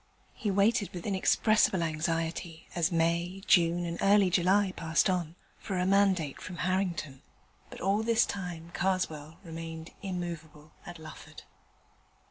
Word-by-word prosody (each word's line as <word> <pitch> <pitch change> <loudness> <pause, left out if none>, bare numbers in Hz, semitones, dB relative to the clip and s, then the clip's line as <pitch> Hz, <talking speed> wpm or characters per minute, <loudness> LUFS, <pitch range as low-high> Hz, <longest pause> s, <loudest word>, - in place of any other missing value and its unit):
He 225 -5 -3
waited 200 +2 +2
with 175 - -6
inexpressible 200 -1 +3
anxiety 165 +1 -2
as 170 +1 +1
May, 170 +3 0
June, 175 -1 +4
and 170 0 -4
early 195 -2 +5
July 190 +2 +3
passed 165 +3 +2
on, 170 -3 -2 0.2
for 190 - -4
a 180 - +1
mandate 190 -6 +2
from 180 -2 -7
Harrington. 180 -7 -1 0.5
But - - -10
all 195 +3 +2
this 230 +1 +3
time 175 -4 -6
Karswell 165 -4 -2
remained 165 -1 -7
immovable 165 -5 -6 0.2
at 175 - -8
Lufford. 155 -1 -11
175 Hz, 130 wpm, -30 LUFS, 165-195 Hz, 0.5 s, early